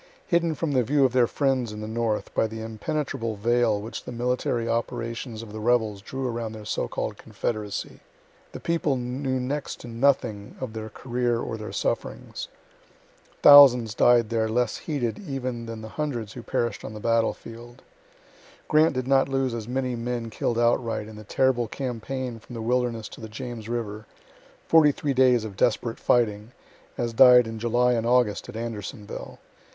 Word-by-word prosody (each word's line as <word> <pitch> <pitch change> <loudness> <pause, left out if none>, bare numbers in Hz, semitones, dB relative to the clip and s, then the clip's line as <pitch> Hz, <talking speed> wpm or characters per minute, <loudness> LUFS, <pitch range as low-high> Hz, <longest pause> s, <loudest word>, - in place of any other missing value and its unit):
Hidden 170 -2 +1
from 160 0 -2
the 130 -2 +3
view 140 +4 +3
of 125 - +1
their 125 -2 +4
friends 130 -5 0
in 105 - -7
the 110 - -5
north 110 -1 -2
by 110 - +2
the 110 +1 -7
impenetrable 115 +1 -3
veil 115 0 +2
which 110 +2 -7
the - - -7
military 120 -1 -1
operations 115 0 -3
of 105 -2 -11
the 110 - -5
rebels 110 -3 +1
drew 130 +5 -4
around 115 -2 -3
the 110 -1 -9
so - - -2
called - - -4
confederacy, 105 -3 -4 0.5
the - - -8
people 165 -4 0
knew 130 +2 -2
next 140 +3 -3
to - - -9
nothing 115 -4 0
of 130 -4 -5
their 110 0 -6
career 120 0 -1
or 115 - -4
their 110 -1 -7
sufferings. - - -3 1.0
Thousands 130 -6 +9
died 120 0 +4
there 110 -1 +1
less 120 0 +1
heeded 130 -8 -3
even 130 - -4
than 115 -1 -6
the 110 - -7
hundreds 120 -8 -3
who 125 - -8
perish'd 120 0 -2
on 110 - -7
the - - -6
battlefield. 115 +1 -2 0.8
Grant 155 -1 +4
did 130 0 -2
not 135 0 +3
lose 135 -2 0
as 115 -2 -5
many 130 0 -1
men 120 -1 -3
kill'd 115 +2 -1
outright, 115 -2 +1
in 110 - -10
the 105 - -10
terrible 120 +2 +1
campaign 125 0 -4
from 120 +2 -11
the 115 - -4
Wilderness 120 -2 0
to - - -12
the 110 - -7
James 115 -1 -7
river 110 -3 -4 0.6
43 150 -3 +4
days 125 -3 +4
of 105 -3 -7
desperate 115 +3 0
fighting 110 -1 +1 0.4
as 120 -1 -2
died 125 0 +8
in 115 0 -6
July 120 +2 +2
and 115 -1 0
August 120 -4 +2
at - - -8
Andersonville. 110 -2 -6
120 Hz, 175 wpm, -25 LUFS, 110-130 Hz, 1.0 s, Thousands